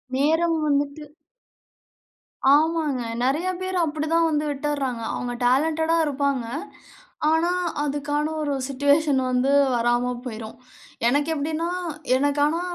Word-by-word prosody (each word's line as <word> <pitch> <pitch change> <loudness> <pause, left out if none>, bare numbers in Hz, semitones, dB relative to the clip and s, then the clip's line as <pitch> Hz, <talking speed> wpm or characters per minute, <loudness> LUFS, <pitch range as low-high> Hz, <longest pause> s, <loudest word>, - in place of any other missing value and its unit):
நேரம் 325 +4 +2
வந்துட்டு 285 +1 0 1.5
ஆமாங்க. 305 -4 +2 0.2
நிறைய 300 +8 +1
பேரு 370 0 -3
அப்பிடித்தான் 315 +1 +1
வந்து 300 0 0
விட்டுருறாங்க. 275 -4 -2
அவுங்க 245 0 -3
டேலன்டடா 320 +6 +2
இருப்பாங்க. 280 -3 -1 0.8
ஆனா, 325 +2 +2 0.3
அதுக்கான 295 +1 -1
ஒரு 290 -2 -1
சிட்யூவேஷன் 285 0 +2
வந்து 255 +2 +1 0.2
வராம 240 +1 +1
போயிரும். 220 -2 -7 0.5
எனக்கு 290 +5 +1
எப்பிடின்னா, 315 +3 -2 0.5
எனக்கு 285 +1 +1
ஆனா, 330 +3 0
290 Hz, 105 wpm, -24 LUFS, 270-315 Hz, 1.5 s, நேரம்